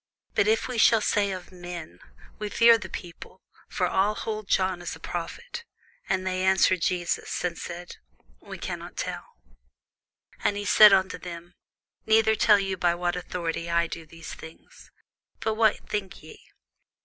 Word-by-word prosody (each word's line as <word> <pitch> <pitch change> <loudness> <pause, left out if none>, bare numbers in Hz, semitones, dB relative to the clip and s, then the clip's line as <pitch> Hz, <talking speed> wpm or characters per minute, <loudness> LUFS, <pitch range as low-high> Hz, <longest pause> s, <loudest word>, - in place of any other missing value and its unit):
But 410 - +2
if 440 +1 +2
we 250 -3 -3
shall 225 0 +6
say, 205 -1 +1
Of 185 -2 -6
men; 175 - -8 0.4
we 210 0 -3
fear 230 +2 +6
the 190 -3 -8
people; 175 -2 -9 0.3
for - - 0
all 205 +3 +1
hold 215 -2 -4
John 185 -2 +1
as 175 - -5
a - - -14
prophet. 320 - -6 0.5
And 185 - 0
they 185 0 -1
answered 190 -1 +3
Jesus, 175 0 -1
and 175 -1 -1
said, 175 +1 -8 0.4
We - - -9
cannot - - -6
tell. - - -5 1.1
And 205 - +1
he 205 - -4
said 210 0 +8
unto 190 -1 +2
them, 175 0 -9 0.5
Neither 220 0 +5
tell 215 -1 +5
I - - 0
you 195 -1 -2
by 175 -1 +2
what 175 0 -1
authority 170 -2 -4
I 170 0 +2
do 165 -1 -8
these 165 0 -10
things. 160 0 -13 0.5
But 220 - -1
what 220 -1 +2
think 200 -5 -4
ye? 155 - -13
185 Hz, 165 wpm, -26 LUFS, 175-210 Hz, 1.1 s, said